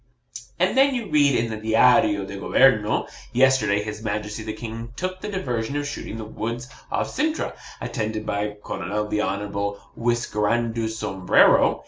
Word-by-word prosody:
And 185 +5 +2
then 270 0 +4
you 230 -5 -4
read 145 -3 +4
in 115 0 0
the 110 - -3
DIARIO 110 -2 +4
DO 100 0 -7
GOBERNO 110 -3 +3 0.3
'Yesterday 120 -6 +3
his 105 0 -6
Majesty 105 0 -3
the 110 0 -4
King 115 +1 -7
took 185 +3 -4
the 210 - -4
diversion 130 - -2
of 145 0 -1
shooting 140 -5 -6
the 110 - -6
woods 115 +3 -4 0.2
off - - -1
Cintra, 310 +1 0 0.3
attended 110 -3 -3
by 105 +1 -2
Colonel 105 +1 -3
the 105 0 0
honourable 100 0 -2 0.2
Whiskerando 115 -1 0
Sombrero. 95 -4 +3
110 Hz, 150 wpm, -24 LUFS, 105-130 Hz, 0.3 s, then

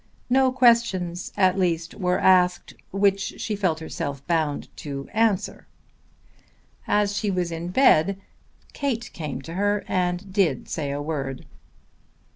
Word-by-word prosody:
No 260 0 +4
questions, 230 -9 +2
at 190 -1 +3
least, 170 -2 0
were 180 -3 0
asked 180 -1 +3 0.2
which 195 0 +1
she 215 - -2
felt 185 -6 0
herself 140 -3 -5
bound 160 -4 -1
to 140 -2 -6
answer. 215 -3 0 1.2
After 205 -1 +2
she 210 0 -1
was 180 -3 -1
in 165 +1 -4
bed 195 - +4 0.5
Kate 245 -5 -2
came 145 -4 -5
to 165 - -8
her 205 +2 0
and 180 +1 -1
did 175 - +1
say 150 -4 -3
a 145 +1 -3
word. 140 -4 -4
180 Hz, 130 wpm, -24 LUFS, 160-205 Hz, 1.2 s, No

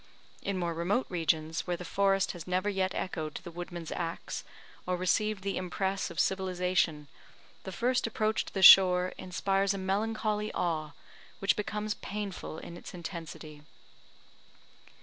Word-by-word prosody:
In 200 -1 -2
more 170 -2 -1
remote 180 +9 0
regions, 160 -2 0
where 175 -1 -1
the 180 - -7
forest 195 +1 +2
has 175 -2 -9
never 185 +2 0
yet 190 -1 0
echoed 155 -4 -3
to - - -6
the 175 - -8
woodman's 175 -1 -6
axe, 165 -1 -4 0.4
or 180 0 0
received 200 +2 +1
the 195 0 -2
impress 190 +2 -1
of 165 - -6
civilisation, 180 -5 +1 0.6
the 190 - -5
first 245 +5 +1
approach 215 -1 0
to - - -11
the 190 - +1
shore 180 -1 +9
inspires 195 +2 0
a - - -3
melancholy 210 +2 -1
awe, 155 -4 -1 0.4
which 195 - +2
becomes 210 0 -2
painful 200 -6 -5
in 170 - -8
its - - -10
intensity. 160 -3 -8
185 Hz, 150 wpm, -30 LUFS, 170-200 Hz, 0.6 s, shore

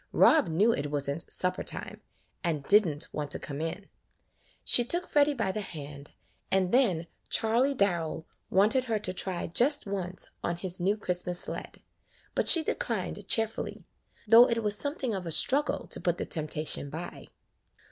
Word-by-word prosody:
Rob 315 -2 +5
knew 190 +8 +2
it 145 -5 -3
was 145 -1 -2
n't 140 +4 -3
supper 180 +1 0
time, - - -5 0.4
and 160 -5 -2
did 210 +4 +4
n't 145 -1 -3
want 150 -1 -4
to - - +1
come 145 +1 -7
in. 175 +5 -5 0.8
She 240 - +6
took 345 +9 -3
Freddy 290 0 +2
by 190 - -1
the 215 - -4
hand, 145 -6 -8 0.3
and 190 -1 +1
then 200 -11 +2 0.2
Charley 240 +5 +1
Darrell 170 -7 -1 0.2
wanted 220 +7 +2
her 225 -3 -1
to 185 -3 -5
try 185 -1 -3
just 275 - +1
once 185 -2 -5
on 170 - -2
his 180 0 -5
new 195 +4 0
Christmas 180 -3 -1
sled, - - -4 0.5
but - - 0
she 330 - +10
declined - - -4
cheerfully, 225 -1 -1 0.4
though 235 +3 +7
it 230 -1 -1
was 210 -1 +1
something 275 -1 -3
of 185 -3 -5
a - - -4
struggle 275 - +3
to - - -1
put 175 -1 0
the - - -4
temptation 155 -2 -1
by. 165 +4 -8
185 Hz, 170 wpm, -28 LUFS, 165-230 Hz, 0.8 s, she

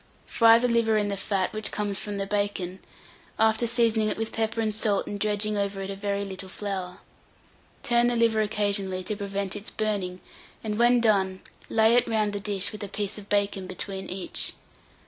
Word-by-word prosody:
Fry 230 -1 +6
the 245 +1 +1
liver 230 -2 +3
in 205 -1 +1
the 200 - -1
fat 195 -1 -1
which 215 0 -2
comes 205 -2 -2
from 205 -1 -5
the 195 - -2
bacon, 195 -2 -2 0.6
after 220 +1 +3
seasoning 230 -2 +2
it - - -2
with 225 0 -2
pepper 225 0 -1
and 220 -1 0
salt 210 -2 +1
and 205 - -5
dredging 210 0 0
over 200 -1 -2
it 195 0 -4
a - - -5
very 200 0 -2
little 190 -1 -7
flour. 190 -3 -4 0.9
Turn 240 0 +3
the 245 - +1
liver 230 -2 +3
occasionally 200 -3 0
to 210 +3 -3
prevent 200 -1 -3
its 205 0 -4
burning, 200 -4 -2 0.4
and 215 0 -2
when 240 0 +5
done, 190 -4 +2 0.3
lay 220 0 +4
it 245 0 +4
round 215 -2 +1
the 205 - -2
dish 200 -1 0
with 215 -1 -7
a - - -3
piece 205 +1 -3
of 205 - -13
bacon 200 -2 0
between 190 +1 -4
each. 185 0 -2
205 Hz, 195 wpm, -26 LUFS, 195-220 Hz, 0.9 s, Fry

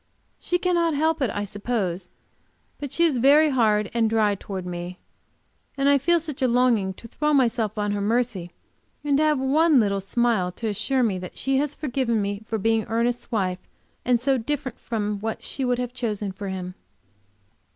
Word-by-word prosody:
She 355 - 0
cannot 345 -3 +1
help 315 +1 +1
it, 260 - +2
I 205 - -3
suppose, 200 -4 -3 0.7
but 285 -3 -5
she 340 - +1
is 300 -7 +3
very 290 +4 +5
hard 215 -5 +2
and 230 -1 +2
dry 215 -2 +2
towards 195 -1 -6
me, 175 0 -6 0.8
and 275 0 +2
I 280 0 +5
feel 340 +5 +3
such 305 -4 -7
a 260 - +4
longing 235 -6 +2
to 230 - -12
throw 300 +5 0
myself 230 -5 +1
on 205 -1 0
her 205 0 -1
mercy, 220 -4 0 0.5
and 290 -1 +2
to 305 - +3
have 305 -1 +3
one 295 +2 +4
little 200 -3 +1
smile 220 -3 +1
to 225 - -4
assure 255 +5 0
me 200 -5 0
that 180 0 -9
she 270 0 0
has 290 +1 0
forgiven 250 -5 -1
me 200 0 -2
for 225 - -1
being 225 +1 +1
Ernest's 235 +2 -1
wife, 185 -5 0 0.4
and 245 -1 +2
so 265 +1 +1
different 265 0 -4
from 210 -3 -2
what 220 +2 -4
she 270 - -3
would 250 -1 +1
have 245 0 -3
chosen 210 -5 -3
for 195 +1 -6
him. 185 -1 -5
235 Hz, 190 wpm, -24 LUFS, 205-270 Hz, 0.8 s, very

